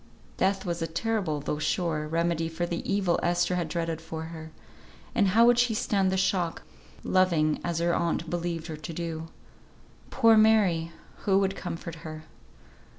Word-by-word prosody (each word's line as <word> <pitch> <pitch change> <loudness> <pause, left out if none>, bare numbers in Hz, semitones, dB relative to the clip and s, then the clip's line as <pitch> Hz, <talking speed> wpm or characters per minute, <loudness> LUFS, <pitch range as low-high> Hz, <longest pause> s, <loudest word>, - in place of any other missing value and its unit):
Death 195 0 0
was 170 -1 -3
a 165 - -1
terrible, 170 -3 -1
though 150 +1 -3
sure, 155 -1 -1
remedy 165 0 0
for 165 +2 -2
the 170 0 -3
evil 195 -3 +1
Esther 175 +1 +1
had 175 -2 -1
dreaded 165 -1 -2
for 160 0 -6
her; 160 -1 -8 0.6
and 220 -5 +3
how 225 +5 +5
would 240 0 +5
she 245 -2 +2
stand 195 -3 +1
the 190 - 0
shock, 185 -3 0 0.4
loving 170 -5 +2
as 170 -1 -2
her 170 +1 +1
aunt 170 0 0
believed 170 -1 -3
her 160 -2 -6
to 155 +2 -7
do? 165 -1 -4 0.8
Poor 225 -1 +5
Mary! 200 -7 +4 0.3
who 195 -1 +2
would 195 0 +1
comfort 165 -3 -6
her? 155 0 -8
170 Hz, 165 wpm, -27 LUFS, 165-190 Hz, 0.8 s, how